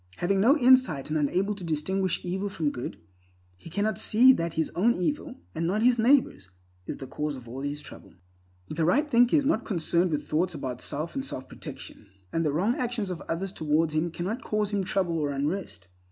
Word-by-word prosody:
Having 195 Hz, +2 st, +1 dB
no 265 Hz, +9 st, +5 dB
insight 255 Hz, -, +4 dB
and 155 Hz, -, +1 dB
unable 185 Hz, +8 st, +1 dB
to 200 Hz, -2 st, -9 dB
distinguish 175 Hz, +4 st, -1 dB
evil 190 Hz, +3 st, -2 dB
from 155 Hz, -6 st, -1 dB
good, 125 Hz, -, -6 dB, 0.6 s
he 90 Hz, -, -13 dB
cannot 205 Hz, +4 st, -1 dB
see 245 Hz, +4 st, +6 dB
that 170 Hz, -7 st, -2 dB
his 160 Hz, -, 0 dB
own 230 Hz, +7 st, +2 dB
evil, 285 Hz, -, -2 dB, 0.2 s
and 165 Hz, +1 st, -1 dB
not 210 Hz, +5 st, 0 dB
his 245 Hz, -1 st, +4 dB
neighbor's, 240 Hz, -, +3 dB, 0.4 s
is -, -, -4 dB
the 135 Hz, -, -7 dB
cause 150 Hz, +3 st, -3 dB
of 125 Hz, -2 st, -11 dB
all 130 Hz, +3 st, -6 dB
his 145 Hz, +1 st, -4 dB
trouble. -, -, -13 dB, 0.5 s
The 160 Hz, -, -2 dB
right 265 Hz, -, +3 dB
thinker 245 Hz, -1 st, +4 dB
is 290 Hz, -3 st, +3 dB
not 255 Hz, -5 st, +1 dB
concerned 175 Hz, -1 st, +1 dB
with 150 Hz, -2 st, -2 dB
thoughts 170 Hz, +3 st, 0 dB
about 130 Hz, -4 st, -5 dB
self 155 Hz, +4 st, -3 dB
and 270 Hz, -, -3 dB
self 130 Hz, -, -6 dB
protection, 105 Hz, -, -10 dB, 0.3 s
and 165 Hz, -, +1 dB
the 150 Hz, -, +1 dB
wrong 185 Hz, +11 st, +1 dB
actions 235 Hz, -6 st, -2 dB
of 175 Hz, -, -5 dB
others 180 Hz, +3 st, -2 dB
towards 155 Hz, -2 st, 0 dB
him 155 Hz, +2 st, 0 dB
cannot 185 Hz, +9 st, -4 dB
cause 210 Hz, -1 st, -1 dB
him 200 Hz, -2 st, 0 dB
trouble 175 Hz, -3 st, 0 dB
or 145 Hz, -2 st, 0 dB
unrest. 140 Hz, -, -3 dB
175 Hz, 205 wpm, -27 LUFS, 150-215 Hz, 0.6 s, see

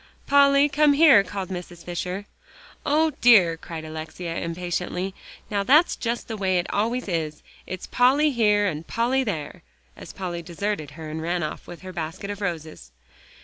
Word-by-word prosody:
"Polly, 280 Hz, 0 st, +5 dB
come 295 Hz, +1 st, +4 dB
here," 280 Hz, -9 st, +7 dB
called 195 Hz, -1 st, -5 dB
Mrs. 175 Hz, -2 st, -8 dB
Fisher. 180 Hz, +3 st, -4 dB, 0.6 s
"O 310 Hz, +2 st, +3 dB
dear!" 195 Hz, -9 st, +6 dB
cried 160 Hz, -1 st, -8 dB
Alexia 160 Hz, +2 st, -6 dB
impatiently, 180 Hz, +2 st, -3 dB, 0.4 s
"now 200 Hz, -1 st, +1 dB
that's 295 Hz, -, +4 dB
just 235 Hz, 0 st, -3 dB
the 225 Hz, -, -4 dB
way 190 Hz, -3 st, +1 dB
it 175 Hz, -, 0 dB
always 230 Hz, +4 st, 0 dB
is. 160 Hz, -4 st, -3 dB, 0.2 s
It's 185 Hz, -, -6 dB
Polly 280 Hz, +5 st, +3 dB
here, 210 Hz, -4 st, +3 dB
and 160 Hz, -4 st, -3 dB
Polly 250 Hz, +3 st, +1 dB
there," 165 Hz, -, -4 dB, 0.3 s
as -, -, -10 dB
Polly 175 Hz, -3 st, -5 dB
deserted 170 Hz, -2 st, -3 dB
her 160 Hz, -1 st, -7 dB
and 155 Hz, +1 st, -5 dB
ran 170 Hz, +1 st, -1 dB
off 150 Hz, -, -6 dB
with 175 Hz, -, -10 dB
her 185 Hz, 0 st, -8 dB
basket 165 Hz, +4 st, -5 dB
of 205 Hz, 0 st, -7 dB
roses. 160 Hz, -, -5 dB
185 Hz, 165 wpm, -24 LUFS, 170-235 Hz, 0.6 s, here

